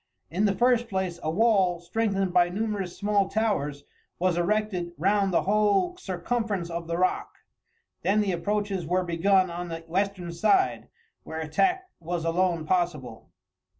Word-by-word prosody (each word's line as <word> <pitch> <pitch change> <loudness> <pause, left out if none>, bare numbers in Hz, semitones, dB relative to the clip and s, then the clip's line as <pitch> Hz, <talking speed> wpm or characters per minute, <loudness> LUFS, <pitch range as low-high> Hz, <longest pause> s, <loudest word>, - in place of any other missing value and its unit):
In 190 +6 +1
the 200 -1 +2
first 240 0 +2
place, 190 -3 -2
a 155 - -2
wall, 190 -2 +3
strengthened 195 +1 -1
by 175 -1 +4
numerous 200 -2 -3
small 205 -2 +1
towers, 150 -11 -1 0.3
was 180 -1 +1
erected 180 -1 -1
round 195 +4 +2
the 175 - +2
whole 210 - +2
circumference 195 - -2
of 170 0 -4
the 170 0 -2
rock; 185 +1 0 0.7
then 205 +2 +2
the 200 -2 0
approaches 200 +1 -1
were 180 +2 +1
begun 185 +2 +2
on 175 +1 -5
the 165 0 -5
western 180 +1 -2
side, 380 - +2 0.3
where 160 - -6
attack 365 - +1
was 170 0 -3
alone 170 -1 +1
possible. 155 -10 -2
185 Hz, 150 wpm, -26 LUFS, 170-210 Hz, 0.7 s, by